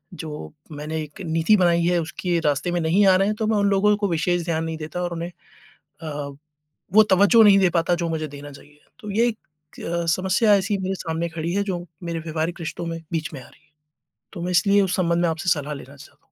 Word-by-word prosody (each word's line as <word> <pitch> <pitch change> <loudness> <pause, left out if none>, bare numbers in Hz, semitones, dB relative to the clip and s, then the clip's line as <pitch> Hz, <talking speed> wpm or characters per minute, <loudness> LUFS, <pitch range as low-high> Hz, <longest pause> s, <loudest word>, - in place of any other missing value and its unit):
जो 155 -3 -7 0.2
मैंने 155 +2 -4
एक 150 +5 -11
नीति 165 +6 +3
बनाई 170 -2 +3
है 175 0 +2
उसके 170 +2 -2
रास्ते 150 +4 +1
में 175 - 0
नहीं 175 +6 +3
आ 190 - +6
रहे 195 +1 +2
हैं, 215 - 0
तो 215 0 -2
मैं 220 -1 +2
उन 200 0 +2
लोगों 205 +1 +3
को 205 -1 0
विशेष 175 +1 0
ध्यान 165 -2 -1
नहीं 160 0 -4
देता 155 +3 -5
और 175 -1 -3
उन्हें 170 +1 -4 0.7
अ, 145 -2 -5 0.6
वो 215 +1 +8
तवज्जो 200 +5 +6
नहीं 205 -2 +7
दे 185 - +4
पाता 170 +1 +2
जो 170 -1 -2
मुझे 155 -1 -2
देना 145 0 -10
चाहिए। 145 +1 -16 0.2
तो 210 -4 -7
ये 230 +4 +3
एक 225 -2 -2 0.5
अ, 170 0 -2
समस्या 190 +3 +3
ऐसी 200 +1 0
मेरे 190 0 -2
सामने 165 -1 -3
खड़ी 165 +1 -4
है 200 - +1
जो 175 -1 -4 0.2
मेरे 170 -1 -3
व्यवहारिक 160 +2 -3
रिश्तों 165 +1 -5
में 165 0 -4
बीच 160 -2 -2
में 135 - -7
आ - - -13
रही - - -21
है, - - -37 0.6
तो 170 - -7
मैं 180 - -2
इसलिए 200 +3 +4
उस 190 -2 0
संबंध 170 -2 +1
में 170 - +3
आपसे 165 +3 -2
सलाह 150 -3 0
लेना 140 0 -11
चाहता 140 - -16
170 Hz, 235 wpm, -23 LUFS, 160-190 Hz, 0.7 s, वो